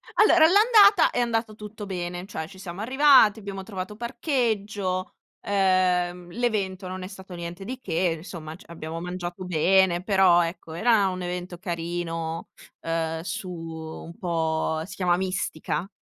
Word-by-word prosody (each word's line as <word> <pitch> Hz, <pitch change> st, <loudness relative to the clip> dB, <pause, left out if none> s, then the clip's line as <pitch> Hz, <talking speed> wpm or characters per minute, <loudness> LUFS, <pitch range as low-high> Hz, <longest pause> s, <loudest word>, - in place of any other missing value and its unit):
Allora, 350 Hz, -6 st, +6 dB
all'andata 410 Hz, +1 st, +6 dB
è -, -, -1 dB
andato 225 Hz, -2 st, 0 dB
tutto 210 Hz, 0 st, -8 dB
bene, 175 Hz, -1 st, -4 dB
cioè 160 Hz, -6 st, -5 dB
ci 190 Hz, +2 st, -14 dB
siamo 185 Hz, 0 st, -7 dB
arrivati, 260 Hz, -3 st, +5 dB
abbiamo 195 Hz, -1 st, -6 dB
trovato 190 Hz, 0 st, -6 dB
parcheggio, 215 Hz, -, -2 dB, 0.3 s
uhm, 180 Hz, -2 st, +1 dB
l'evento 200 Hz, -6 st, -1 dB
non 185 Hz, +1 st, -6 dB
è -, -, -5 dB
stato 190 Hz, -1 st, -11 dB
niente 170 Hz, +2 st, -7 dB
di 255 Hz, +4 st, -5 dB
che, 170 Hz, -6 st, 0 dB
insomma 160 Hz, -2 st, -8 dB
c 185 Hz, -, -16 dB
abbiamo 165 Hz, -1 st, -6 dB
mangiato 180 Hz, +1 st, -5 dB
bene, 180 Hz, +1 st, +3 dB
però 190 Hz, -3 st, +5 dB
ecco, 165 Hz, -1 st, -6 dB
era 210 Hz, +3 st, +3 dB
un 185 Hz, -1 st, -3 dB
evento 180 Hz, 0 st, -5 dB
carino, 165 Hz, -2 st, -4 dB, 0.3 s
uhm, 165 Hz, 0 st, -2 dB
su, 185 Hz, +1 st, -5 dB
un 165 Hz, 0 st, -8 dB
po', 160 Hz, -3 st, -1 dB
si 190 Hz, +1 st, -10 dB
chiama 180 Hz, -2 st, +2 dB
mistica, 185 Hz, -1 st, -2 dB
185 Hz, 145 wpm, -25 LUFS, 170-205 Hz, 0.3 s, Allora